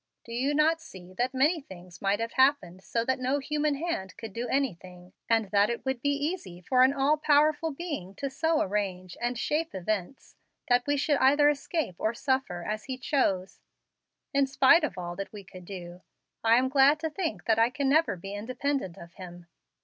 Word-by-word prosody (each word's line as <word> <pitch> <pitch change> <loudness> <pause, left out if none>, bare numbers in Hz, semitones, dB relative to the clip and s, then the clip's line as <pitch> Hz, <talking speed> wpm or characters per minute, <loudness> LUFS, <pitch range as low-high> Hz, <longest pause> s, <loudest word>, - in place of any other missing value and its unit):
Do 230 - -9
you 270 +5 0
not 320 +2 +3
see 185 - -12
that 250 +1 +1
many 300 +5 +2
things 180 -7 -13
might 200 +1 +1
have 230 0 -3
happened 260 -10 +2
so 230 0 -1
that 260 +1 0
no 260 +2 0
human 295 +1 -1
hand 275 - -4
could 225 -3 -8
do 235 +3 -3
anything, 185 -9 -3 0.2
and 225 -3 +2
that 205 +1 +4
it 235 +2 -4
would 265 -2 -2
be 285 - +1
easy 285 - -3
for 255 +8 +2
an 260 +1 +6
all 280 +2 +2
powerful 300 +2 +3
Being 280 - -6
to 275 - -3
so 315 +4 0
arrange 185 -3 -2
and 240 0 -1
shape 310 +4 -1
events 190 +5 -4 0.3
that 245 +1 +3
we 290 0 +2
should 290 +1 +2
either 290 +2 +5
escape 290 - -2
or 220 +2 0
suffer, 260 -12 -1
as 215 +3 -4
He 260 -1 -4
chose, 195 -9 -1 0.7
in 275 -1 +3
spite 275 +5 +5
of 300 - -2
all 175 -1 -5
that 195 - -5
we 205 -2 -9
could 185 -1 -13
do. 180 -2 -9 0.4
I 225 0 +5
am 255 +2 +3
glad 275 +2 +4
to 320 - -1
think 310 - -3
that 225 -1 +2
I 230 +1 +4
can 275 +2 -2
never 310 -4 +3
be 195 +3 -8
independent 250 -1 -3
of 170 0 -12
Him." 175 -2 -11
250 Hz, 200 wpm, -28 LUFS, 190-285 Hz, 0.7 s, an